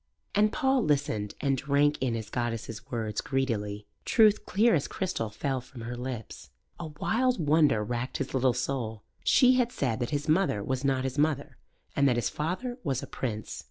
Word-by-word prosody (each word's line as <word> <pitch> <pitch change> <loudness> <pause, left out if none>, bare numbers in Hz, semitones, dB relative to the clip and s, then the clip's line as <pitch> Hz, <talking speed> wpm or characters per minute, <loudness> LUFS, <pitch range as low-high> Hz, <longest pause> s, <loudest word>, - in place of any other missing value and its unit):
And 210 +1 +4
Paul 265 -3 +2
listened 135 -9 0
and 140 -2 +2
drank 145 +2 +2
in 125 -3 0
his 110 -2 -6
goddess's 115 -2 -4
words 110 -3 -2
greedily. 105 -7 -2 0.2
Truth 215 -2 +4
clear 225 +4 +4
as 150 -3 +1
crystal 185 - -2
fell 130 +4 -2
from 125 0 -12
her 120 +2 -5
lips. 120 -3 -6 0.3
A 170 - -4
wild 235 +10 0
wonder 150 -7 +3
racked 120 +3 -3
his 135 - -4
little 130 -1 +3
soul. 120 -5 -3 0.2
She 255 0 +5
had 245 -2 +2
said 125 - -1
that 120 - -1
his 145 0 -2
mother 155 - +2
was 130 +3 -2
not 135 -1 +1
his 130 +2 -2
mother, 150 -2 0 0.4
and 140 -1 +4
that 125 - +2
his 120 -5 0
father 215 - -3
was 135 -6 -1
a - - -3 0.2
prince. 110 -5 -3
135 Hz, 185 wpm, -28 LUFS, 120-160 Hz, 0.4 s, She